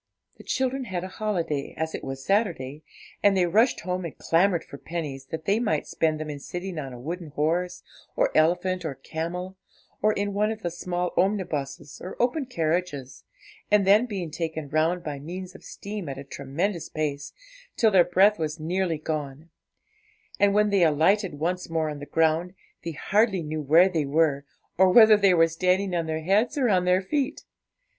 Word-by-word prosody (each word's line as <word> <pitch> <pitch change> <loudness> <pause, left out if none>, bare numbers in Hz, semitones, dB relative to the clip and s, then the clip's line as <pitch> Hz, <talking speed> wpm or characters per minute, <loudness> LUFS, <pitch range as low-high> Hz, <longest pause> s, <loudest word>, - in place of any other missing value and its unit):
The - - -11
children 260 0 -1
had 185 -5 -4
a - - -4
holiday, 170 -9 -2
as 160 0 -2
it - - -5
was 135 0 -6
Saturday, 165 - 0 0.4
and 200 -1 +4
they 180 - +4
rushed 220 +9 +3
home 180 +1 -3
and 170 - -7
clamoured 170 +1 +2
for 140 - -11
pennies, 145 -6 -5
that 160 +2 -6
they 205 +5 +2
might 160 -11 0
spend 155 -1 0
them 155 - -4
in 145 -1 -6
sitting 175 +3 -5
on 135 -3 -6
a 125 - -9
wooden 170 +6 -5
horse, 165 +5 -1 0.3
or - - +1
elephant, 180 +3 +2
or 155 -4 -4
camel, 175 +7 -5 0.4
or 215 - +4
in 205 0 -2
one 210 +2 +1
of 220 -1 -7
the 175 - -2
small 175 +1 -3
omnibuses 155 -8 -2
or 185 - -8
open 255 +3 0
carriages, 160 - -2 0.4
and 210 -2 +4
then 210 +5 +5
being 185 -7 -4
taken 160 -2 -4
round 160 +4 +1
by 145 -2 -5
means 180 +5 -7
of 190 - -14
steam 200 -6 -7
at 135 - -5
a 140 - -7
tremendous 155 +7 -3
pace, 145 -2 -3 0.5
till 220 -2 +4
their 185 -3 +6
breath 190 +4 +4
was 155 0 -3
nearly 170 +1 -1
gone; 150 0 -5 0.9
and 200 0 +4
when 210 0 +3
they 200 -2 +3
alighted 170 +4 +2
once 175 +5 -2
more 160 -2 -1
on 145 - -7
the 145 - -8
ground, 165 +3 +1 0.3
they 165 0 -4
hardly 200 +3 +1
knew 155 0 -3
where 160 +6 +5
they 165 -6 -1
were, 145 -1 +1 0.3
or 190 0 +6
whether 220 0 +8
they 195 -3 +4
were 165 -1 +5
standing 185 +3 0
on 165 -1 -1
their 160 0 -2
heads 210 - +2
or 255 -4 +2
on 185 -3 +2
their 180 +1 +3
feet. 275 +6 -2
175 Hz, 190 wpm, -26 LUFS, 155-195 Hz, 0.9 s, whether